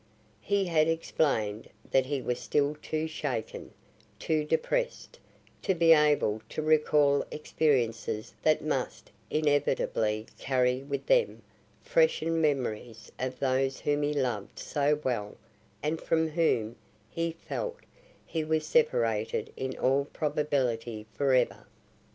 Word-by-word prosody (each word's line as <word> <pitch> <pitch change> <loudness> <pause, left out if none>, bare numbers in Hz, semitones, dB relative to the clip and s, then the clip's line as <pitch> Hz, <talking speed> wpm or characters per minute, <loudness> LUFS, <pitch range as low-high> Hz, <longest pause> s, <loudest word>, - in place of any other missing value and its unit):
He 200 - +1
had 160 -3 +3
explained 135 -10 0 0.2
that 130 -1 +3
he 140 -2 -2
was 125 0 -2
still 145 +3 0
too 155 0 -2
shaken, 140 -8 -4 0.5
too 155 -1 0
depressed, - - -1 0.4
to 190 - +1
be 165 -1 +6
able 150 -8 +3
to 155 - -3
recall 150 -2 +3
experiences 120 -8 -1
that - - +2
must - - -3 0.2
inevitably 135 -7 +1
carry 130 -1 +1
with 140 0 -4
them - - +2 0.4
freshened 475 - +2
memories 120 -6 -2
of 130 0 -3
those 135 0 0
whom 145 0 +1
he 145 0 +1
loved 125 -8 -2
so 145 +1 0
well 105 -5 -2 0.5
and 155 +2 -1
from 160 -1 +1
whom, 125 -9 +1 0.3
he 165 +7 -2
felt, 475 - -5 0.4
he 160 -2 -2
was 155 0 0
separated 115 -8 +1
in 130 0 -4
all 135 +2 +2
probability 130 -8 -1
forever. 130 -3 +1
145 Hz, 120 wpm, -29 LUFS, 125-155 Hz, 0.5 s, be